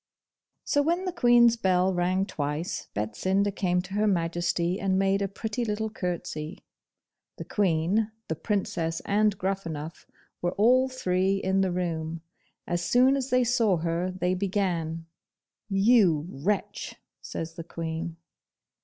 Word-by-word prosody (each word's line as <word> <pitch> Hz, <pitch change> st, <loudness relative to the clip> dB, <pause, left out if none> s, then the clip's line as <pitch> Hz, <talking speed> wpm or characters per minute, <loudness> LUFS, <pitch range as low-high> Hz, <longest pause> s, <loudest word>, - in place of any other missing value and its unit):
So 290 Hz, -, +2 dB
when 340 Hz, +5 st, 0 dB
the 365 Hz, -, -1 dB
Queen's 240 Hz, -3 st, +5 dB
bell 185 Hz, -3 st, +2 dB
rang 185 Hz, +2 st, +1 dB
twice, 150 Hz, -2 st, -3 dB
Betsinda 185 Hz, -, 0 dB
came 180 Hz, -2 st, +1 dB
to 190 Hz, +1 st, -10 dB
Her 210 Hz, +1 st, +2 dB
Majesty 175 Hz, 0 st, 0 dB
and 190 Hz, -1 st, +1 dB
made 195 Hz, +1 st, +2 dB
a 200 Hz, -, +1 dB
pretty 220 Hz, +4 st, -4 dB
little 220 Hz, 0 st, -2 dB
curtsey. 175 Hz, -4 st, -5 dB, 0.7 s
The -, -, -6 dB
Queen, 200 Hz, +3 st, +1 dB, 0.2 s
the 160 Hz, -, -2 dB
Princess, 165 Hz, -3 st, -2 dB
and 210 Hz, 0 st, +2 dB
Gruffanuff 170 Hz, -5 st, -4 dB, 0.3 s
were 175 Hz, +1 st, 0 dB
all 255 Hz, +5 st, +4 dB
three 190 Hz, -6 st, +1 dB
in 190 Hz, 0 st, +1 dB
the 190 Hz, -1 st, +1 dB
room. 165 Hz, -2 st, -3 dB, 0.4 s
As 175 Hz, -1 st, -1 dB
soon 255 Hz, +8 st, +4 dB
as 270 Hz, -1 st, -2 dB
they 255 Hz, -1 st, +3 dB
saw 230 Hz, -6 st, +2 dB
her 165 Hz, +2 st, -1 dB
they 185 Hz, 0 st, -1 dB
began, 180 Hz, -4 st, -1 dB, 0.6 s
'You 195 Hz, -6 st, +4 dB
wretch!' 190 Hz, +6 st, -3 dB, 0.3 s
says 165 Hz, 0 st, -5 dB
the 165 Hz, -, -7 dB
Queen. 165 Hz, 0 st, -5 dB
185 Hz, 135 wpm, -27 LUFS, 170-210 Hz, 0.7 s, Queen's